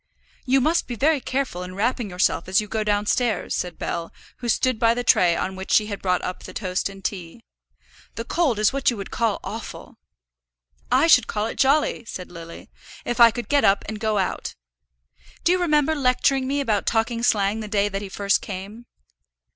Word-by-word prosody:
"You 265 Hz, +1 st, +4 dB
must 325 Hz, +5 st, +1 dB
be 245 Hz, -, -4 dB
very 290 Hz, +4 st, +2 dB
careful 260 Hz, -10 st, -2 dB
in 180 Hz, 0 st, -7 dB
wrapping 230 Hz, +1 st, -1 dB
yourself 180 Hz, 0 st, 0 dB
as 190 Hz, +1 st, +3 dB
you 210 Hz, -, -3 dB
go 215 Hz, +1 st, -2 dB
downstairs," 210 Hz, +1 st, 0 dB
said 175 Hz, -2 st, -3 dB
Bell, 165 Hz, 0 st, -4 dB, 0.3 s
who 240 Hz, -, -5 dB
stood 255 Hz, 0 st, +1 dB
by 230 Hz, 0 st, +3 dB
the 245 Hz, -, -2 dB
tray 175 Hz, -6 st, +4 dB
on 190 Hz, +2 st, -3 dB
which 190 Hz, 0 st, -8 dB
she 215 Hz, -, +4 dB
had 205 Hz, -2 st, -6 dB
brought 180 Hz, -1 st, 0 dB
up 180 Hz, -, -4 dB
the -, -, -11 dB
toast 185 Hz, -1 st, -2 dB
and 195 Hz, -1 st, -13 dB
tea. 185 Hz, +3 st, -5 dB, 0.7 s
"The 230 Hz, -, -4 dB
cold 305 Hz, -8 st, +1 dB
is 215 Hz, +4 st, +2 dB
what 275 Hz, -1 st, +2 dB
you 240 Hz, -, -3 dB
would 195 Hz, -, -7 dB
call 230 Hz, -3 st, 0 dB
awful." -, -, -8 dB, 0.9 s
"I -, -, +4 dB
should 250 Hz, -8 st, +5 dB
call 210 Hz, 0 st, -2 dB
it 225 Hz, -, -6 dB
jolly," 275 Hz, -2 st, +2 dB
said 180 Hz, -5 st, -8 dB
Lily, 170 Hz, -1 st, -11 dB, 0.3 s
"if 240 Hz, +1 st, -3 dB
I 235 Hz, -1 st, +9 dB
could 235 Hz, +2 st, -6 dB
get 285 Hz, -1 st, +2 dB
up 195 Hz, 0 st, +3 dB
and 215 Hz, 0 st, -5 dB
go 215 Hz, -1 st, 0 dB
out. 190 Hz, -2 st, -2 dB, 0.9 s
Do 345 Hz, -, +3 dB
you 365 Hz, -, +2 dB
remember 305 Hz, -2 st, +2 dB
lecturing 265 Hz, -1 st, +1 dB
me 280 Hz, +1 st, 0 dB
about 215 Hz, -7 st, -1 dB
talking 230 Hz, +1 st, 0 dB
slang 210 Hz, -3 st, +1 dB
the 215 Hz, -, -5 dB
day 205 Hz, -1 st, +1 dB
that 195 Hz, -1 st, -4 dB
he 200 Hz, -, -7 dB
first 200 Hz, 0 st, +1 dB
came?" 205 Hz, +5 st, -8 dB
220 Hz, 200 wpm, -23 LUFS, 195-250 Hz, 0.9 s, I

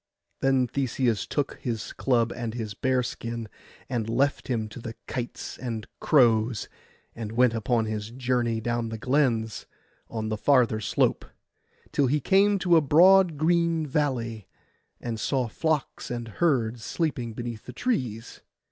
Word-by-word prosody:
Then 135 Hz, -1 st, +3 dB
Theseus 125 Hz, -4 st, -1 dB
took 145 Hz, -2 st, -2 dB
his 115 Hz, -5 st, -4 dB
club 120 Hz, -3 st, +1 dB
and 115 Hz, -1 st, -4 dB
his 110 Hz, -4 st, -4 dB
bearskin, 115 Hz, -2 st, -2 dB, 0.4 s
and 120 Hz, -4 st, -2 dB
left 140 Hz, +5 st, +1 dB
him 115 Hz, -5 st, -1 dB
to 115 Hz, -, -9 dB
the 115 Hz, -1 st, -7 dB
kites 120 Hz, -2 st, -5 dB
and 115 Hz, -4 st, -4 dB
crows, 120 Hz, -5 st, +3 dB, 0.5 s
and 110 Hz, -2 st, -6 dB
went 125 Hz, 0 st, +4 dB
upon 115 Hz, 0 st, +1 dB
his 110 Hz, -1 st, -4 dB
journey 120 Hz, -2 st, 0 dB
down 120 Hz, 0 st, -2 dB
the 110 Hz, -, -5 dB
glens 120 Hz, -3 st, 0 dB, 0.4 s
on 110 Hz, -1 st, -3 dB
the 110 Hz, -, -1 dB
farther 120 Hz, -3 st, +3 dB
slope, 100 Hz, -, +1 dB, 0.7 s
till 140 Hz, -, +2 dB
he 150 Hz, +4 st, +2 dB
came 200 Hz, +6 st, +4 dB
to 180 Hz, -3 st, +4 dB
a -, -, +5 dB
broad 175 Hz, +3 st, +6 dB
green 165 Hz, 0 st, +2 dB
valley, 125 Hz, -7 st, -1 dB, 0.5 s
and 115 Hz, -2 st, -4 dB
saw 130 Hz, -1 st, 0 dB
flocks 155 Hz, +5 st, -2 dB
and 120 Hz, -1 st, -4 dB
herds 120 Hz, -9 st, +1 dB
sleeping 125 Hz, -, -2 dB
beneath 120 Hz, -2 st, -6 dB
the -, -, -5 dB
trees. 125 Hz, -, -2 dB
120 Hz, 145 wpm, -26 LUFS, 115-140 Hz, 0.7 s, broad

